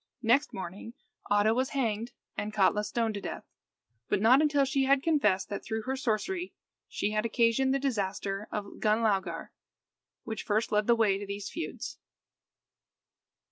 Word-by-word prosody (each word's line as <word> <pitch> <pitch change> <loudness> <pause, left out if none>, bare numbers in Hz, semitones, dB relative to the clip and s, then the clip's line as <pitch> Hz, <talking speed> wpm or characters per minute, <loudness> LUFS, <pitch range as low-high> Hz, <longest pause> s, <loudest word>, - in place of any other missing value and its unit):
Next 265 +6 +3
morning 195 +5 -7 0.3
Oddo 205 +2 +4
was 260 +3 0
hanged, 230 -2 -1 0.2
and 210 - -3
Katla 210 0 +3
stoned 225 0 -1
to 200 - -5
death; - - -5 0.7
but - - +2
not 245 +7 +6
until 290 -2 +3
she 270 0 +1
had 275 0 +3
confessed 285 - +2
that, 200 - -4
through 220 -1 -3
her 265 +3 -2
sorcery, 270 - -2 0.3
she 210 - -2
had 215 0 0
occasioned 230 +3 +2
the 270 - +3
disaster 200 -6 -2
of 205 -1 -5
Gunlaugar, 205 -6 +1 0.7
which 220 -2 -4
first 215 +2 0
led 210 0 +2
the 235 - +6
way 210 -4 +2
to 205 - -6
these 200 0 -5
feuds. 335 - -5
220 Hz, 155 wpm, -29 LUFS, 205-265 Hz, 0.7 s, not